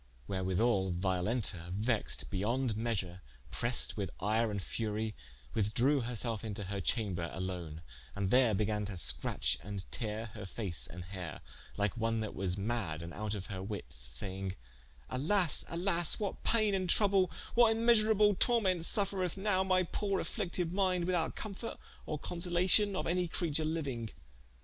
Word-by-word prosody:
Wherewithall 95 - +1
Violenta 90 0 -1
vexed 110 0 -1
beyonde 115 +4 0
measure 100 -5 -2 0.3
pressed 120 -1 +3
with 100 -4 -2
yre 110 +3 +1
and 105 -1 -2
furie, 110 +2 -2 0.4
withdrewe 120 +5 +2
herselfe 115 -2 -2
into 105 -2 -4
her 100 +1 -3
chamber 90 -6 -1
alone, 90 -4 -5 0.3
and 100 -1 -1
there 125 -4 +5
began 105 +1 0
to 100 - -5
scratche 65 -4 +1
and 100 0 -5
teare 110 -1 -3
her 105 -4 -7
face 90 - +1
and 90 +6 -7
heare, 90 -4 -7 0.4
like 100 +1 0
one 115 -1 0
that 110 - -4
was 90 -2 -1
madde 100 -7 -2
and 85 +1 -7
out 105 +1 -3
of 95 -2 -5
her 95 -4 -5
wittes, 95 - -6
saying: 95 +9 -3 0.5
"Alas, 170 +5 +2
alas, 170 -1 +1
what 205 -2 -3
payne 215 -3 +3
and 185 -2 0
trouble, 195 -2 +5 0.2
what 235 -1 +6
vnmeasurable 215 -3 +4
tormentes 190 -8 +3
suffreth 195 -3 +1
nowe 190 -1 +2
my 185 -1 +3
poore 195 +2 -1
afflicted 180 -5 -2
mynde, 185 -3 +2
without 175 -3 0
comfort 215 +2 -6 0.3
or 155 - -2
consolation 180 +5 +2
of - - -1
any 180 +1 +1
creature 160 -2 -1
liuing? 140 -8 -2
115 Hz, 150 wpm, -33 LUFS, -, 0.5 s, what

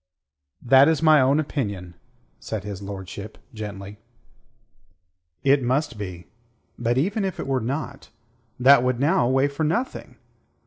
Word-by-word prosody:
"That 135 +3 +6
is 160 -1 +1
my 155 -3 +6
own 135 +3 +3
opinion," 100 - -4 0.5
said 110 -3 -5
his 100 -2 -7
lordship 100 +1 -8 0.2
gently. 105 -2 -8 1.4
"It 140 0 +4
must 130 -1 -1
be. 90 -4 -7 0.5
But 120 +1 0
even 195 +9 0
if 190 -1 -3
it - - -3
were 135 -2 -1
not, 140 +3 -5 0.5
that 130 +1 +7
would 125 -1 0
now 140 -4 +2
weigh 135 +2 +3
for 145 +2 -4
nothing. 225 +12 -3
130 Hz, 135 wpm, -23 LUFS, 105-145 Hz, 1.4 s, that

